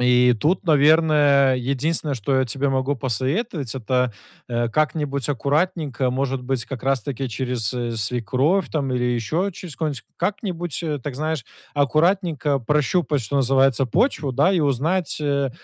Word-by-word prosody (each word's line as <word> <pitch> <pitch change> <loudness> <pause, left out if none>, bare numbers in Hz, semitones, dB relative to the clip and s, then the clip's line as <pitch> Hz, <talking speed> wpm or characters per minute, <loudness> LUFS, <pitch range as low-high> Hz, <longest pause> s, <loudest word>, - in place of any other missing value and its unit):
и 125 0 +5
тут, 175 +6 +1
наверное, 150 -3 +4
единственное, 140 +4 -1
что 125 +3 -1
я 130 0 +2
тебе 135 +3 -1
могу 135 +2 0
посоветовать, 135 - -2
это, 125 0 0 0.4
э, 120 -1 0
как-нибудь 140 -1 -1
аккуратненько, 145 -1 0
может 135 0 -2
быть, 125 -2 -2
как 130 -1 -7
раз 135 -2 +1
таки 135 0 -4
через, 120 -1 -2
э, 120 -1 -2
свекровь 130 - 0
там 140 -4 -1
или 125 -1 0
еще 125 - 0
через 170 -3 -9
кого-нибудь, 150 -7 -3
как-нибудь, 175 - -3
э, 155 -3 -2
так, 135 0 -6
знаешь, 155 -1 -2 0.3
аккуратненько 155 0 +1
прощупать, 150 +3 +1
что 120 +5 -3
называется, 135 0 +3
почву, 140 - 0
да, 145 +8 +3
и 185 -4 +2
узнать 150 +5 0
э, 140 -2 0
140 Hz, 150 wpm, -22 LUFS, 125-155 Hz, 0.4 s, и